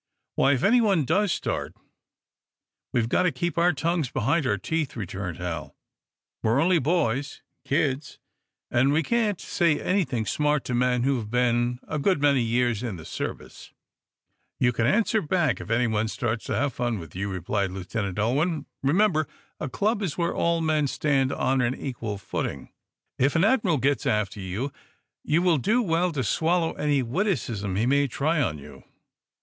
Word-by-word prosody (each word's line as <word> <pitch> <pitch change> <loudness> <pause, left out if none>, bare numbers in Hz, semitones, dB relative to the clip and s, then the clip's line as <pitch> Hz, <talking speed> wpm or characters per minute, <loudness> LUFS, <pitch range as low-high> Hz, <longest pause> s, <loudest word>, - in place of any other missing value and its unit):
"Why, 140 - +3
if 130 - -1
anyone 205 - +4
does 190 +6 +2
start, - - -3 1.2
we've 115 -2 +1
got 120 - +2
to 180 -2 +2
keep 170 +6 -2
our 175 +1 +4
tongues 165 -2 -1
behind 135 +5 0
our - - +1
teeth," 160 -3 -2
returned 95 -5 -5
Hal. 85 -4 -5 0.7
"We're 115 +4 +2
only 170 +2 +4
boys 140 -3 -1 0.2
kids 140 -2 -1 0.5
and 130 +3 +3
we 155 +3 +2
can't 215 -1 0
say 170 -5 +1
anything 165 - 0
smart 150 +3 +1
to 125 - -3
men 125 0 +2
who 135 0 +2
have 110 -3 -5
been 120 0 +1
a 155 - -2
good 185 +2 +2
many 140 -2 +3
years 120 -1 +1
in 120 -5 -3
the 80 -2 -10
service." - - -6 0.9
"You 125 -1 +3
can 115 0 +1
answer 220 - +2
back, 155 - 0
if - - -9
anyone 115 -2 +1
starts 115 0 -2
to - - -2
have 145 +2 +1
any - - -25
fun 120 -2 0
with 80 -3 -10
you," 100 +2 -2
replied 95 +2 -1
Lieutenant 95 +1 -4
Ulwin. 145 - 0 0.2
"Remember, 155 +2 +2 0.3
a 150 - -3
club 205 - 0
is 180 -7 -3
where 170 -1 0
all 170 0 +1
men 155 -2 +1
stand 135 -1 +1
on 130 -1 +1
an 125 +1 0
equal 115 -6 -5
footing. 70 -8 -4 0.5
If 135 +4 +2
an 165 - +3
admiral 205 - +3
gets 140 +2 0
after 105 -1 0
you, 100 +9 -4 0.5
you 165 +4 +2
will 170 -5 +3
do 230 - +2
well 175 -1 +1
to 135 -4 -1
swallow 165 - +1
any 145 -3 +1
witticism 120 - -1
he 110 +4 +1
may 140 +2 +3
try 150 +5 0
on 80 - -1
you. 70 - -13
135 Hz, 175 wpm, -26 LUFS, 115-165 Hz, 1.2 s, anyone